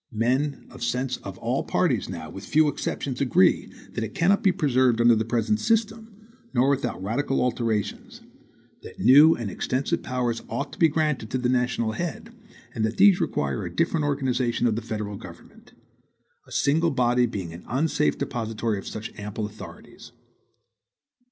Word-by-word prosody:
Men 130 +6 0
of 130 - -12
sense 125 +1 -1
of 95 -1 -9
all 120 +4 -1
parties 135 - 0
now, 80 -4 -7
with 95 - -9
few 155 +5 +3
exceptions, 140 -2 -3
agree 120 -8 +3 0.2
that - - -2
it 110 0 -6
cannot 195 +4 +3
be 195 - +4
preserved 130 -8 +2
under 120 0 +6
the 110 - 0
present 120 - 0
system, 225 0 0 0.4
nor 125 +3 +4
without 130 -9 -2
radical 135 +7 -1
alterations; 115 -4 -2 0.6
that - - -12
new 150 +5 +7
and 110 -5 -5
extensive 130 +8 -1
powers 120 -2 -2
ought 140 +1 -4
to - - -12
be 165 - +6
granted 150 -7 -1
to 130 - -1
the 125 -1 0
national 125 -3 0
head, 220 - -5 0.4
and 110 - -2
that 110 +1 -1
these 195 -2 +6
require 70 -2 -1
a - - -4
different 165 -2 +1
organization 130 -4 0
of 115 -3 +2
the 115 - -3
federal 105 -3 -5
government - - -14 0.7
a - - -17
single 160 +4 +2
body 125 -3 +2
being 95 -7 -5
an 85 - -10
unsafe 150 +3 +1
depositary 115 -5 -2
of - - -10
such 110 +1 -6
ample 105 +1 -4
authorities. 105 +1 -11
125 Hz, 165 wpm, -25 LUFS, 110-150 Hz, 0.7 s, new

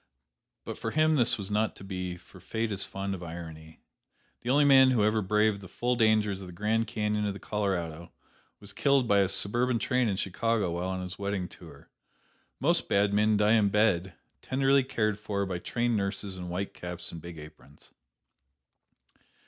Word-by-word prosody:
But - - -6
for - - -3
him 155 +1 +3
this 120 -5 +4
was 100 -1 -5
not 105 +1 0
to - - -12
be, 90 -2 -5
for - - -17
Fate 110 0 -3
is 100 -1 +1
fond 95 0 -4
of 95 - -6
irony. 80 -2 -9 0.6
The 120 - -5
only 145 +3 +4
man 135 -2 +7
who 120 -5 +2
ever 110 +1 +2
braved 105 +1 +1
the 95 - -10
full 125 +6 -1
dangers 110 -4 +2
of 95 - -8
the 90 - -10
Grand 110 +5 0
Canyon 105 -1 -1
of 100 - -2
the - - -8
Colorado 85 -6 -3 0.5
was 100 -1 -10
killed 140 -3 +2
by 100 -1 +4
a 95 -2 +2
suburban 120 +6 +1
train 125 +1 +1
in 95 - -1
Chicago 105 0 0
while 85 +2 -3
on 95 0 -3
his 90 +1 -8
wedding 100 -2 -2
tour. - - -14 0.7
Most - - +1
bad 100 0 +2
men 105 +1 +3
die 105 +1 +4
in 105 -3 +4
bed, 95 -4 +1 0.3
tenderly 135 +1 +2
cared 110 -5 -1
for 100 -2 -2
by 90 -2 -4
trained 120 +4 -1
nurses 100 -1 -3
in 90 -1 -7
white 95 +3 -4
caps 90 0 -4
and 85 - -8
big 85 0 -9
aprons. 75 -1 -14
100 Hz, 190 wpm, -28 LUFS, 95-110 Hz, 0.7 s, man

